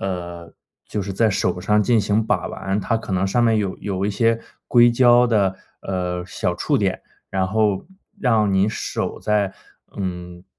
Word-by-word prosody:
呃， 85 Hz, -3 st, -5 dB, 0.4 s
就 105 Hz, -, -2 dB
是 100 Hz, +1 st, -5 dB
在 110 Hz, +3 st, +2 dB
手 90 Hz, -2 st, -1 dB
上 105 Hz, +3 st, +2 dB
进 115 Hz, +2 st, +3 dB
行 105 Hz, +2 st, +1 dB
把 125 Hz, -, 0 dB
玩， 95 Hz, +1 st, -3 dB
它 115 Hz, -, 0 dB
可 110 Hz, -3 st, -7 dB
能 95 Hz, +1 st, +1 dB
上 120 Hz, +5 st, +1 dB
面 115 Hz, -1 st, +3 dB
有 100 Hz, -3 st, -2 dB
有 100 Hz, -1 st, -2 dB
一 -, -, 0 dB
些 115 Hz, +2 st, +1 dB, 0.3 s
硅 120 Hz, -1 st, +6 dB
胶 120 Hz, 0 st, +5 dB
的， 100 Hz, -5 st, +1 dB, 0.2 s
呃， 90 Hz, -1 st, -3 dB
小 85 Hz, -, -2 dB
触 -, -, 0 dB
点， -, -, -1 dB, 0.3 s
然 95 Hz, -1 st, 0 dB
后 105 Hz, -1 st, +1 dB, 0.4 s
让 110 Hz, -5 st, +2 dB
你 95 Hz, +2 st, +3 dB
手 -, -, -3 dB
在 105 Hz, -2 st, 0 dB, 0.4 s
嗯， 90 Hz, -2 st, -5 dB
100 Hz, 185 characters per minute, -21 LUFS, 95-110 Hz, 0.4 s, 硅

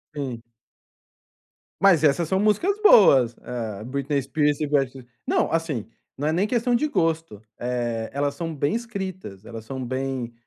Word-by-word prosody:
Sim. 130 Hz, -5 st, -4 dB, 1.4 s
Mas 180 Hz, -6 st, +5 dB
essas 155 Hz, +3 st, +3 dB
são 190 Hz, +3 st, +1 dB
músicas 215 Hz, -, +2 dB
boas, 135 Hz, -, +6 dB
eh, 110 Hz, -4 st, -5 dB
Britney 140 Hz, +3 st, -2 dB
Spears, 145 Hz, +2 st, 0 dB
Ivete 135 Hz, -4 st, -1 dB, 0.2 s
não, -, -, +1 dB
assim, 165 Hz, -9 st, -1 dB, 0.3 s
não 145 Hz, -, -2 dB
é -, -, +2 dB
nem 185 Hz, +5 st, +1 dB
questão 240 Hz, +1 st, 0 dB
de 270 Hz, +6 st, +2 dB
gosto, 165 Hz, -, -1 dB, 0.2 s
eh, 120 Hz, -2 st, -2 dB
elas 140 Hz, 0 st, -1 dB
são 165 Hz, +2 st, -5 dB
bem 145 Hz, +5 st, 0 dB
escritas, 190 Hz, -, -6 dB
elas 115 Hz, -1 st, -8 dB
são 130 Hz, +2 st, -5 dB
bem 130 Hz, -1 st, -3 dB
145 Hz, 150 wpm, -24 LUFS, 125-175 Hz, 1.4 s, boas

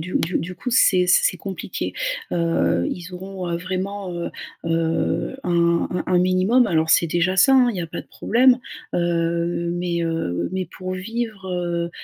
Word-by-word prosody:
du 180 Hz, +3 st, -6 dB
du 170 Hz, -, 0 dB
du 180 Hz, +2 st, -5 dB
coup, 250 Hz, +8 st, -5 dB
c'est 185 Hz, -7 st, +4 dB
c 180 Hz, -, +5 dB
c'est -, -, +2 dB
compliqué. 190 Hz, +2 st, -5 dB, 0.4 s
Heu, 85 Hz, -, +1 dB
ils 180 Hz, 0 st, -7 dB
auront, 185 Hz, 0 st, -6 dB
heu, 170 Hz, -, 0 dB
vraiment, 185 Hz, +1 st, -4 dB
heu 170 Hz, 0 st, -4 dB, 0.3 s
heu, 165 Hz, +8 st, 0 dB
un 170 Hz, -1 st, +2 dB
un 180 Hz, -, -2 dB
un 180 Hz, -1 st, +3 dB
minimum. 185 Hz, +7 st, +3 dB
Alors, 160 Hz, -1 st, +1 dB
c'est 165 Hz, +1 st, +4 dB
déjà 175 Hz, +3 st, +1 dB
ça 270 Hz, +8 st, +6 dB
hein, 255 Hz, -2 st, +5 dB
il 215 Hz, -, -5 dB
y -, -, -2 dB
a 170 Hz, -, -3 dB
pas 165 Hz, -, -6 dB
de -, -, -15 dB
problème, 250 Hz, +2 st, +3 dB, 0.4 s
heu, 170 Hz, 0 st, 0 dB
mais 175 Hz, -1 st, -1 dB
heu, 165 Hz, -, -2 dB
mais 190 Hz, -1 st, -2 dB
pour 185 Hz, +2 st, -6 dB
vivre, 220 Hz, +1 st, -4 dB
heu 175 Hz, -1 st, -2 dB
180 Hz, 185 wpm, -22 LUFS, 170-190 Hz, 0.4 s, ça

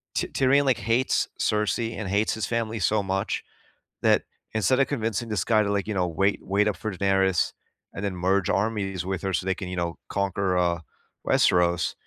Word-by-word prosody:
T -, -, 0 dB
Tyrion, 140 Hz, +1 st, +3 dB
like, 130 Hz, -2 st, +3 dB
hates 115 Hz, +5 st, +1 dB
Cersei 110 Hz, +2 st, 0 dB
and 100 Hz, -4 st, -4 dB
hates 105 Hz, +2 st, +1 dB
his 110 Hz, -, -2 dB
family 115 Hz, -1 st, -2 dB
so 105 Hz, +2 st, +2 dB
much, 95 Hz, 0 st, -2 dB, 0.6 s
that -, -, +4 dB, 0.3 s
instead 120 Hz, +5 st, +2 dB
of 135 Hz, -, +3 dB
convincing 115 Hz, -3 st, -2 dB
this 100 Hz, -3 st, 0 dB
guy 110 Hz, -2 st, +3 dB
to, 100 Hz, -, -1 dB
like, 100 Hz, +1 st, -1 dB
you 105 Hz, -, -2 dB
know, 90 Hz, -2 st, +1 dB
wait 95 Hz, +5 st, +1 dB
wait 100 Hz, +2 st, +1 dB
up 105 Hz, -, -1 dB
for 110 Hz, -, -4 dB
Daenerys, 95 Hz, -1 st, +2 dB, 0.4 s
and 95 Hz, -, -6 dB
then 95 Hz, -2 st, -2 dB
merge 95 Hz, +1 st, +1 dB
armies 100 Hz, -3 st, -1 dB
with 95 Hz, -1 st, -3 dB
her 95 Hz, -, -1 dB
so 90 Hz, -, -1 dB
they 95 Hz, -, 0 dB
can, 95 Hz, -4 st, -6 dB
you 90 Hz, -, -4 dB
know, 85 Hz, -1 st, -2 dB
conquer, 100 Hz, -2 st, 0 dB
uh, 85 Hz, -1 st, +1 dB, 0.5 s
Westeros, 90 Hz, -1 st, +3 dB
100 Hz, 200 wpm, -25 LUFS, 95-110 Hz, 0.6 s, that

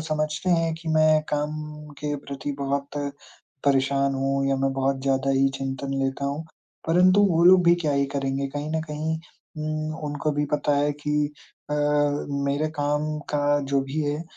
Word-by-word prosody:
समझते 155 Hz, +3 st, -1 dB
हैं 165 Hz, -1 st, +2 dB
कि 165 Hz, -, -5 dB
मैं 155 Hz, 0 st, +5 dB
काम 150 Hz, +1 st, 0 dB, 0.5 s
के 150 Hz, 0 st, -2 dB
प्रति 140 Hz, +1 st, -4 dB
बहुत 140 Hz, 0 st, -2 dB, 0.7 s
परेशान 140 Hz, 0 st, +2 dB
हूँ 135 Hz, 0 st, 0 dB
या 135 Hz, -, +2 dB
मैं 135 Hz, -, +1 dB
बहुत 135 Hz, 0 st, 0 dB
ज़्यादा 135 Hz, 0 st, +1 dB
ही 135 Hz, 0 st, +4 dB
चिंतन 135 Hz, 0 st, -3 dB
लेता 135 Hz, +1 st, -2 dB
हूँ, 145 Hz, +3 st, -2 dB, 0.4 s
परंतु 180 Hz, +4 st, +5 dB
वो 170 Hz, 0 st, +3 dB
लोग 180 Hz, 0 st, +7 dB
भी 170 Hz, 0 st, +6 dB
क्या 150 Hz, -, +2 dB
ही 140 Hz, 0 st, +2 dB
करेंगे, 135 Hz, 0 st, -1 dB
कहीं 145 Hz, +2 st, -4 dB
न 160 Hz, -, 0 dB
कहीं 155 Hz, +2 st, -2 dB, 0.4 s
उम, 155 Hz, 0 st, -3 dB
उनको 145 Hz, +1 st, -1 dB
भी 145 Hz, 0 st, 0 dB
पता 145 Hz, 0 st, +1 dB
है 145 Hz, +1 st, +2 dB
कि 150 Hz, 0 st, +1 dB, 0.4 s
अ, 150 Hz, -, +1 dB, 0.7 s
मेरे 145 Hz, +3 st, 0 dB
काम 145 Hz, +1 st, 0 dB, 0.3 s
का 145 Hz, 0 st, +2 dB
जो 140 Hz, -1 st, +3 dB
भी 135 Hz, +3 st, -3 dB
है, 145 Hz, +2 st, -1 dB
145 Hz, 170 wpm, -25 LUFS, 140-155 Hz, 0.7 s, लोग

